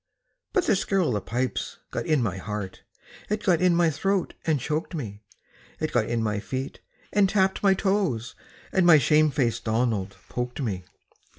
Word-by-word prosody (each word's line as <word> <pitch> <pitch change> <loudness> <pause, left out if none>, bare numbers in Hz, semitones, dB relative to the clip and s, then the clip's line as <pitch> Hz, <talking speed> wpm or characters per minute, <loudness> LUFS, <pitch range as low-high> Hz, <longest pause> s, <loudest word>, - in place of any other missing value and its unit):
But 375 -5 +2
the - - +3
skirl 190 -2 +1
o' - - 0
the 105 - -1
pipes 125 +1 -2
got - - -3
in 150 -5 +3
my 95 -5 -2
heart, 105 -1 -5 0.5
It 210 0 -1
got 175 -3 +3
in 180 -1 +4
my 170 -1 +3
throat 195 +6 0
and 155 -3 +2
choked 155 +6 -2
me, 105 -9 -6 0.6
It - - -2
got - - +1
in 115 -1 0
my 105 -1 0
feet, 130 +5 -5 0.3
and 200 -1 +4
tapped 190 -1 +2
my 195 -1 +4
toes, 185 - 0 0.4
And 190 - +3
my 165 -3 +9
shame 150 +3 +4
faced 130 -5 -1
Donald 110 -4 0
poked 125 +2 -4
me. 100 -9 -3
140 Hz, 180 wpm, -26 LUFS, 110-185 Hz, 0.6 s, my